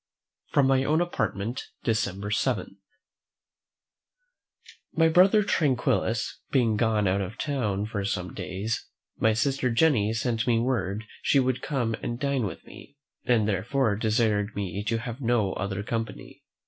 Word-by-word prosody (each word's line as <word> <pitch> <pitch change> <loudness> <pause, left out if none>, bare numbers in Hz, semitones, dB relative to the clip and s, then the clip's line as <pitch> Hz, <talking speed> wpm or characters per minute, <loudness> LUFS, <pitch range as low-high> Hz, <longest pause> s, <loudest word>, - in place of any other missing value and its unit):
From 140 - +3
my 135 0 +3
own 155 +3 +2
Apartment, 115 - -2 0.2
December 105 -3 -1
7. 105 -4 -1 2.2
My 165 -1 +4
brother 190 +6 +5
Tranquillus 125 - 0
being 120 -5 +2
gone 110 -2 +2
out 95 +2 +1
of 95 +3 -5
town 105 -9 -1
for 105 -2 -3
some 90 -2 -3
days, 100 +4 -4 0.3
my 110 -1 +3
sister 130 +3 +1
Jenny 115 -4 +3
sent 115 +1 -1
me 120 -2 +3
word 110 -4 -1 0.2
she 140 - +3
would 130 -1 0
come 125 -6 -1
and 120 0 -4
dine 140 -5 0
with - - -9
me, 140 - -14 0.3
and 115 -4 +3
therefore 110 +3 +1
desired 110 -1 +1
me 100 0 -3
to 115 +1 0
have 120 +3 -6
no 115 -6 +1
other 100 +1 -3
company. 115 +1 -5
115 Hz, 140 wpm, -27 LUFS, 105-130 Hz, 2.2 s, brother